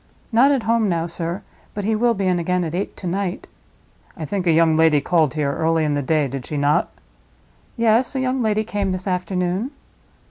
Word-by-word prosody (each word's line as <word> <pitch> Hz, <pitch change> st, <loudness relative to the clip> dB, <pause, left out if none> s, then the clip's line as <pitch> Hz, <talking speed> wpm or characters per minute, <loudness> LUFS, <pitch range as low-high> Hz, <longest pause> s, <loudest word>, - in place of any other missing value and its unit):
"Not 245 Hz, +5 st, +5 dB
at 270 Hz, -5 st, +1 dB
home 225 Hz, -1 st, +2 dB
now, 165 Hz, -2 st, 0 dB
sir; 170 Hz, +1 st, -4 dB, 0.3 s
but 205 Hz, -, -3 dB
he 220 Hz, -, +1 dB
will 235 Hz, +1 st, +2 dB
be 195 Hz, -1 st, -2 dB
in 180 Hz, -1 st, +2 dB
again 180 Hz, +1 st, 0 dB
at 160 Hz, -2 st, -4 dB
eight 185 Hz, +3 st, -3 dB
to -, -, -9 dB
night." 185 Hz, +1 st, -2 dB, 0.7 s
"I 160 Hz, -, -4 dB
think 190 Hz, 0 st, -3 dB
a -, -, +5 dB
young 160 Hz, 0 st, +4 dB
lady 160 Hz, -2 st, +4 dB
called 155 Hz, -1 st, +1 dB
here 145 Hz, -2 st, 0 dB
early 160 Hz, +1 st, +1 dB
in 150 Hz, -1 st, 0 dB
the 145 Hz, -, 0 dB
day, 150 Hz, +1 st, +1 dB
did 135 Hz, 0 st, -6 dB
she 150 Hz, -, -4 dB
not?" 145 Hz, +1 st, +2 dB, 0.9 s
"Yes; 230 Hz, +3 st, +2 dB
a -, -, 0 dB
young 260 Hz, 0 st, 0 dB
lady 215 Hz, -1 st, +1 dB
came 200 Hz, -3 st, -2 dB
this 185 Hz, 0 st, -5 dB
afternoon." 180 Hz, +3 st, -1 dB
180 Hz, 210 wpm, -21 LUFS, 160-215 Hz, 0.9 s, Not